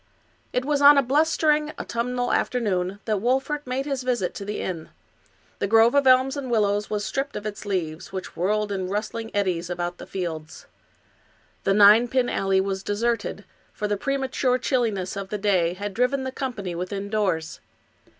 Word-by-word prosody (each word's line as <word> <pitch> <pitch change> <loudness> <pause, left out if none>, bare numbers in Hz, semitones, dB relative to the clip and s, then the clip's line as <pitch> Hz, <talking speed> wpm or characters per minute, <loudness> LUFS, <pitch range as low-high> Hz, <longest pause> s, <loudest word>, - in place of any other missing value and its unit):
It 250 - -1
was 290 0 +1
on 285 0 +9
a 280 - +5
blustering 300 +2 +2
autumnal 245 +1 -2
afternoon 195 -5 0
that 215 -3 0
Wolfert 265 +4 0
made 260 +2 -2
his 275 -3 -2
visit 245 -7 -1
to - - -6
the 205 +1 -4
inn. 170 -4 -4 0.7
The - - 0
grove 225 +3 +5
of 280 -1 +3
elms 260 +2 +5
and 275 -3 -5
willows 205 -2 +1
was 210 -1 -2
stripped 275 +1 -3
of 210 - -5
its 210 0 -6
leaves, 170 -3 -3
which 190 -1 -6
whirled 210 +3 0
in 190 -2 -2
rustling 225 +3 -3
eddies 180 -4 0
about 175 0 -3
the - - -9
fields. 160 -5 -5 1.0
The 195 - +3
ninepin 235 +5 +6
alley 195 0 +1
was 190 0 -1
deserted, 230 +4 -2 0.3
for 210 - -3
the 205 - 0
premature 265 +1 0
chilliness 225 -8 -1
of 195 -1 -5
the 210 - -2
day 185 -4 +1
had 200 +1 -5
driven 250 +5 +1
the 260 - -3
company 240 -10 -4
within 190 +3 -4
doors. 185 -7 -1
210 Hz, 170 wpm, -24 LUFS, 190-255 Hz, 1.0 s, on